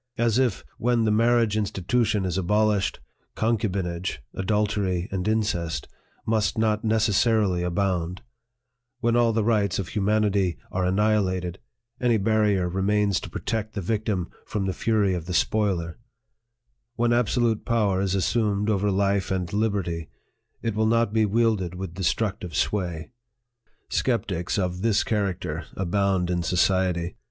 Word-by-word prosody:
As 115 0 +2
if, 125 -6 +1 0.2
when 120 -1 +2
the 110 - +2
marriage 115 0 +3
institution 105 0 0
is 90 -2 -2
abolished, 105 +2 +1 0.4
concubinage, 95 - -1 0.2
adultery, 100 -2 0
and 95 0 -2
incest, 100 -7 -1 0.4
must 110 -2 +1
not 110 0 +1
necessarily 110 -3 +2
abound; 90 0 -1 0.8
when 120 -1 +2
all 120 -1 +4
the 110 -1 +1
rights 105 -4 +1
of 95 -3 -3
humanity 100 -4 +1
are 90 0 0
annihilated, 95 -2 +1 0.4
any 120 -2 +3
barrier 105 -3 +2
remains 100 +2 +1
to - - -8
protect 110 -1 -3
the - - -1
victim 100 -2 -2
from 105 -3 -3
the 95 - -1
fury 105 -3 +1
of 85 -2 -4
the 90 - -2
spoiler; 95 -5 0 1.0
when 120 0 +2
absolute 120 -1 +1
power 105 -5 +1
is 95 -1 0
assumed 105 +1 +1
over 100 0 +1
life 100 0 +1
and 90 -2 -2
liberty, 100 -6 -1 0.5
it 115 - -1
will 110 +1 +1
not 115 -1 +2
be 110 -1 +3
wielded 105 -5 +1
with 95 -2 -6
destructive 95 -1 -2
sway! 90 -4 -1 0.8
Skeptics 100 -9 -1
of 90 -2 -1
this 110 -1 +2
character 95 -7 -2
abound 95 -1 +1
in 90 -1 0
society. 90 -1 +1
100 Hz, 135 wpm, -25 LUFS, 90-110 Hz, 1.0 s, all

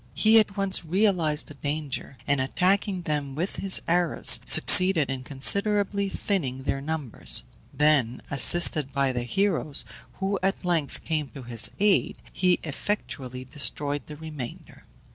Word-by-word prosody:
He 220 +1 +4
at 205 -2 -1
once 195 -2 -1
realized 170 -4 0
the - - -12
danger, 145 -1 -5
and, 140 -2 0
attacking 185 +6 -1
them 145 -4 -4
with 175 +6 -4
his 195 -1 +2
arrows, 175 -1 +5
succeeded 185 -7 +6
in 130 -1 -6
considerably 200 +8 +1
thinning 140 -11 -2
their 135 0 -3
numbers; 150 -5 -1 0.3
then, 145 -6 +1
assisted 145 0 +2
by 140 -1 0
the 125 - -3
heroes, 160 +1 -1 0.3
who 195 0 -3
at 195 0 -2
length 165 -5 -2
came 155 -4 -3
to 135 - -9
his 115 -2 +1
aid, 205 -1 +1 0.2
he 180 -1 +1
effectually 130 -6 -5
destroyed 145 +1 -2
the 150 - -9
remainder. 150 -5 -10
155 Hz, 140 wpm, -25 LUFS, 135-190 Hz, 0.3 s, succeeded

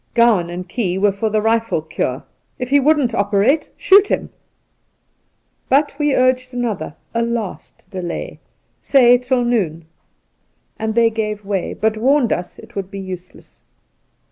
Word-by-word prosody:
Gowan 225 -8 +4
and 180 +1 -6
Key 185 -3 -2
were 200 +1 +3
for 200 +3 -2
the 215 0 0
rifle 225 -7 +1
cure. 135 -4 -3 0.3
If 250 +1 -5
he 285 - +6
wouldn't 280 -4 +2
operate, 205 +8 +1
shoot 400 +1 +5
him! - - -2 1.4
But 285 +2 +3
we 295 -2 +2
urged 255 0 +1
another 215 -11 -3
— - - -42
a 230 - 0
last 235 -6 -5
— - - -36
delay, 180 -3 -5 0.4
say 245 -3 +5
tiQ 250 0 0
noon; 175 -10 -1 0.9
and 220 0 -2
they 230 -1 +4
gave 210 -2 -3
way, 195 -2 -2
but 220 +1 0
warned 260 +2 +3
us 175 0 -5
it - - -15
would 195 -2 -4
be 200 - -8
useless. 185 -2 -10
220 Hz, 155 wpm, -19 LUFS, 195-250 Hz, 1.4 s, he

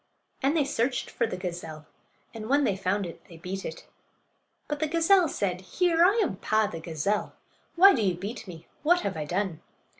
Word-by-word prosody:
And 285 +4 +2
they 295 - +3
searched 250 -2 -1
for - - 0
the 185 - -5
gazelle, 170 -4 -6 0.5
and 220 -1 -7
when 285 +2 +4
they 205 -7 +1
found 195 +1 -1
it 170 - -9
they 170 - -13
beat 185 +3 -5
it. - - -7 0.8
But 295 -1 -3
the 315 - +1
gazelle 335 +3 +4
said: 185 -9 -2
"Here! 335 - +2
I 385 +4 +5
am 190 - -2
Paa, 215 +2 +1
the 170 -5 -5
gazelle. 165 +6 -2 0.4
Why 390 +3 +8
do 230 - 0
you 190 -4 +1
beat 205 +5 -6
me? 170 -3 -10 0.2
What 350 +4 +3
have - - -2
I 155 -1 -3
done?" 185 +1 -2
210 Hz, 200 wpm, -27 LUFS, 180-300 Hz, 0.8 s, Why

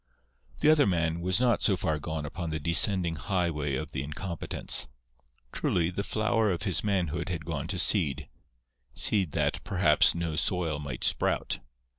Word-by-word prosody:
The 155 - +6
other 150 -3 +4
man 85 -3 0
was 90 +4 +2
not 125 -1 +2
so 100 -4 +2
far 80 -2 -1
gone 80 -1 -4
upon 85 +2 -5
the 80 0 -3
descending 85 +2 +4
Highway 75 -6 -1
of - - -5
the 65 - -3
Incompetents. 75 -1 -3 0.6
Truly, 85 -1 0
the 95 - -3
flower 110 0 0
of 85 - -3
his 95 -5 +1
manhood 90 -6 -1
had 85 -4 -4
gone 80 -3 -4
to 95 - -3
seed—seed 65 - -1
that, - - -1
perhaps, - - +4
no 85 -2 -3
soil 80 -3 0
might 70 -4 -6
sprout. - - 0
85 Hz, 155 wpm, -28 LUFS, 75-95 Hz, 0.6 s, The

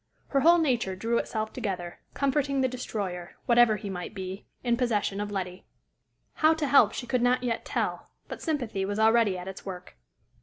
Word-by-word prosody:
Her 275 - +2
whole 335 +5 +6
nature 245 - +1
drew 230 +5 0
itself 220 -1 -3
together, 185 -7 -4 0.2
confronting 275 0 +1
the 260 - +3
destroyer, 200 -8 -5
whatever 240 -2 +5
he 210 0 -6
might 185 +1 -5
be, 190 0 -6 0.2
in 240 -1 +2
possession 210 -5 0
of 205 - -3
Letty. 185 -2 -4 0.8
How 315 +1 +6
to 315 -2 -1
help 280 0 +6
she 245 - -4
could 250 0 0
not 250 +1 +2
yet 235 -2 -2
tell, - - -2 0.2
but - - -7
sympathy 245 - -2
was 205 +1 -2
already 220 -3 +4
at 180 +1 -7
its 190 0 -7
work. 180 - -8
225 Hz, 185 wpm, -28 LUFS, 195-255 Hz, 0.8 s, whole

